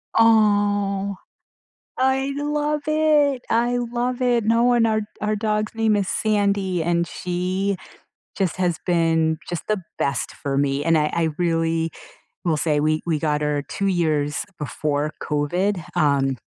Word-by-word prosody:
Aw. 205 Hz, -3 st, +3 dB, 0.8 s
I 265 Hz, +1 st, +1 dB
love 295 Hz, 0 st, -1 dB
it. 300 Hz, -4 st, +3 dB
I 240 Hz, +1 st, +2 dB
love 245 Hz, +1 st, -2 dB
it. 240 Hz, -3 st, +2 dB
No 235 Hz, +2 st, +3 dB
and 235 Hz, -1 st, +4 dB
our 215 Hz, 0 st, +1 dB, 0.2 s
our 210 Hz, 0 st, 0 dB
dog's 215 Hz, 0 st, -1 dB
name 225 Hz, -1 st, +2 dB
is 200 Hz, -2 st, 0 dB
Sandy, 200 Hz, -5 st, 0 dB
and 170 Hz, 0 st, +1 dB
she 185 Hz, +2 st, -2 dB, 0.6 s
just 190 Hz, -4 st, 0 dB
has 175 Hz, -3 st, 0 dB
been, 165 Hz, -2 st, +2 dB
just 175 Hz, -2 st, -3 dB
the 215 Hz, -3 st, 0 dB, 0.2 s
best 140 Hz, -4 st, -1 dB
for 140 Hz, -1 st, -3 dB
me, 140 Hz, 0 st, +1 dB
and 165 Hz, 0 st, +3 dB
I 150 Hz, -, +2 dB
I 165 Hz, -1 st, +1 dB
really 165 Hz, -1 st, 0 dB, 0.5 s
will 160 Hz, -3 st, +2 dB
say 150 Hz, -1 st, +1 dB
we 155 Hz, +1 st, +1 dB
we 160 Hz, -3 st, 0 dB
got 150 Hz, -1 st, 0 dB
her 150 Hz, -1 st, 0 dB
2 200 Hz, -, -1 dB
years 155 Hz, -5 st, 0 dB
before 150 Hz, 0 st, -2 dB
COVID, 175 Hz, +5 st, -1 dB
um, 135 Hz, -3 st, +2 dB
185 Hz, 145 wpm, -22 LUFS, 160-225 Hz, 0.8 s, and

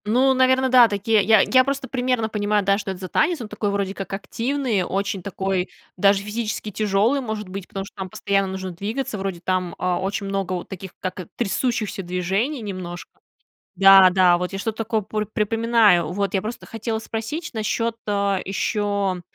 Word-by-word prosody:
Ну, 255 Hz, +5 st, +3 dB
наверно, 260 Hz, 0 st, +3 dB
да, 250 Hz, -2 st, +7 dB
такие. 210 Hz, +1 st, +2 dB
Я 220 Hz, 0 st, +6 dB
я 255 Hz, 0 st, +4 dB
просто 275 Hz, 0 st, -3 dB
примерно 250 Hz, -3 st, 0 dB
понимаю, 210 Hz, -1 st, 0 dB
да, 195 Hz, +1 st, +3 dB
что 205 Hz, -, -5 dB
это 185 Hz, -, -7 dB
за 185 Hz, -, -6 dB
танец. 330 Hz, -, +1 dB
Он 225 Hz, -, -5 dB
такой 210 Hz, 0 st, -2 dB
вроде 200 Hz, -1 st, -1 dB
как 195 Hz, -2 st, -7 dB
активный, 230 Hz, +1 st, -1 dB
очень 195 Hz, +2 st, -2 dB
такой 190 Hz, 0 st, -2 dB, 0.3 s
даже 200 Hz, +1 st, +3 dB
физически 210 Hz, 0 st, -4 dB
тяжёлый, 215 Hz, +7 st, +1 dB
может 220 Hz, -4 st, -4 dB
быть, 185 Hz, 0 st, -7 dB
потому 195 Hz, 0 st, -5 dB
что -, -, -15 dB
там 190 Hz, -1 st, -6 dB
постоянно 195 Hz, +1 st, 0 dB
нужно 190 Hz, 0 st, -5 dB
двигаться, 215 Hz, +7 st, -4 dB
вроде 190 Hz, -3 st, -4 dB
там, 185 Hz, -1 st, -1 dB
а, 180 Hz, -1 st, 0 dB
очень 200 Hz, +1 st, -2 dB
много 195 Hz, -1 st, -2 dB
вот 180 Hz, -, -5 dB
таких 190 Hz, -1 st, -8 dB
как 185 Hz, -2 st, -5 dB
трясущихся 225 Hz, -1 st, -1 dB
движений 190 Hz, -, -1 dB
немножко. 185 Hz, -4 st, -7 dB, 0.7 s
Да-да, 185 Hz, -2 st, +7 dB
вот 180 Hz, +2 st, -3 dB
я 195 Hz, -, -4 dB
что-то 220 Hz, +2 st, -3 dB
такое 225 Hz, -1 st, -1 dB
пр 215 Hz, +1 st, -3 dB
припоминаю. 225 Hz, -5 st, +3 dB
Вот 200 Hz, +1 st, -2 dB
я 190 Hz, -, +1 dB
просто 225 Hz, +2 st, -6 dB
хотела 225 Hz, 0 st, -3 dB
спросить 225 Hz, +9 st, -5 dB
насчёт, 230 Hz, +1 st, -1 dB
а, 200 Hz, -2 st, +1 dB
ещё, 200 Hz, -1 st, -1 dB
200 Hz, 180 wpm, -22 LUFS, 190-225 Hz, 0.7 s, да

